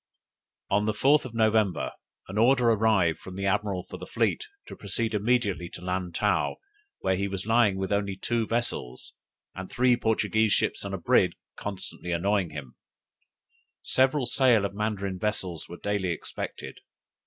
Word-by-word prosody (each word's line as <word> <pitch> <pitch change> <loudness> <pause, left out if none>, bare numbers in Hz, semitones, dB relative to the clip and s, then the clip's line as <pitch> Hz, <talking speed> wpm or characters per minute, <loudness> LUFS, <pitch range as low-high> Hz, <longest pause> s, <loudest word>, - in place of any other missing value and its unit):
"On 105 +1 +3
the 110 - +1
4th 140 +5 +3
of 120 -3 -8
November 110 -4 +2 0.4
an 95 +3 -3
order 120 0 +5
arrived 100 -7 +2
from 95 - -10
the 100 +1 -3
admiral 100 -2 0
for - - -8
the - - -8
fleet 430 - 0 0.2
to - - -9
proceed 110 +3 -2
immediately 105 -5 +1
to 85 - -9
Lantow, 90 +2 0 0.5
where 95 - +1
he 100 +2 -1
was 95 -1 -4
lying 115 -3 +3
with 95 +1 -3
only 100 -1 0
two 115 +2 -1
vessels, 115 - -3 0.4
and 95 0 -7
three 125 0 +3
Portuguese 110 -1 +1
ships - - +1
and 100 -1 -4
a - - -3
brig 85 - +3 0.2
constantly 95 -3 -6
annoying 95 +1 +1
him; 75 -5 -8 1.1
several 130 +1 +3
sail 120 -4 +4
of 100 - -3
Mandarin 100 -3 -2
vessels 95 -6 -2
were 85 - -8
daily 100 -2 -1
expected. 85 - -6
100 Hz, 155 wpm, -27 LUFS, 95-115 Hz, 1.1 s, order